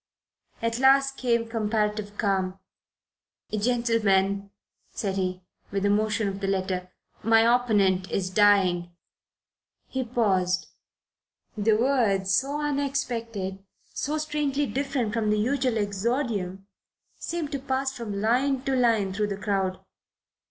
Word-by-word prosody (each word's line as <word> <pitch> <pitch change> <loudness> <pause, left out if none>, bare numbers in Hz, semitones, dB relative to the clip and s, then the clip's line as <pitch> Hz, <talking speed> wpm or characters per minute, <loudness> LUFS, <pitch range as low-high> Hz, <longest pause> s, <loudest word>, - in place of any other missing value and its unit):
At 230 +1 0
last 275 +1 +4
came 235 -3 0
comparative 210 -2 -1
calm. 190 -3 0 0.9
"Gentlemen," 205 -4 +1 0.4
said 195 -3 -3
he, 185 -1 -2 0.3
with 195 0 -1
a 200 - +3
motion 215 0 +1
of 195 0 -4
the 195 - -2
letter, 185 -1 -1 0.3
"my 225 +1 +5
opponent 210 -6 +3
is 185 -1 -2
dying." 190 -4 +4 1.0
He 260 0 -3
paused. 190 -6 +1 0.9
The 215 +1 +2
words, 215 -6 +2
so 280 +5 +1
unexpected, 240 -9 -2 0.3
so 300 +2 -2
strangely 295 -2 -1
different 265 -3 -2
from 225 -2 0
the 210 - +2
usual 255 +1 +1
exordium, 205 -2 -2 0.5
seemed 330 -4 -4
to 280 - -2
pass 265 0 -2
from 210 -4 -4
line 255 +5 +1
to 270 -1 0
line 225 -6 +2
through 210 +2 0
the 200 -1 -4
crowd. 195 -2 -2
215 Hz, 120 wpm, -26 LUFS, 195-255 Hz, 1.0 s, my